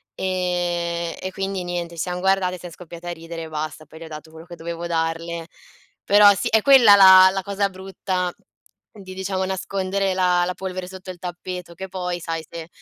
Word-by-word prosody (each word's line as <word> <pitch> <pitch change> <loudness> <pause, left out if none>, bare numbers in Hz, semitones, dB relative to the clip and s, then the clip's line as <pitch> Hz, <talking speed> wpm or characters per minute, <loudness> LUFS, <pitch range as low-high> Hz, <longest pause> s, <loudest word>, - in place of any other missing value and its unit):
ehm, 175 -2 -2
e 185 - -5
quindi 195 -1 -3
niente, 175 -1 -4
ci 165 - -4
siam 180 0 -3
guardate 190 -1 +1
e - - -11
siam 175 0 -9
scoppiate 175 0 -11
a - - -2
ridere 165 0 -7
e - - -7
basta. 155 0 -5
Poi 160 - -14
le 165 - -9
ho - - -9
dato 155 0 -9
quello 160 +1 -13
che 175 -1 -11
dovevo 170 +1 -6
darle. 165 0 -2 0.6
Però 205 0 +7
sì 195 - -2
è 220 0 +4
quella 245 -5 +8
la 190 -1 +9
la 195 0 -2
cosa 200 0 -1
brutta 185 -1 -3 0.6
di 190 -3 -11
diciamo 190 0 -2
nascondere 190 0 -2
la 180 -1 +2
la 180 - -2
polvere 185 -1 -5
sotto 185 0 -10
il 180 - -13
tappeto 180 0 -7
che 190 +3 -7
poi 180 -1 -4
sai 165 -1 -4
se 165 -1 -8
180 Hz, 200 wpm, -22 LUFS, 170-190 Hz, 0.6 s, la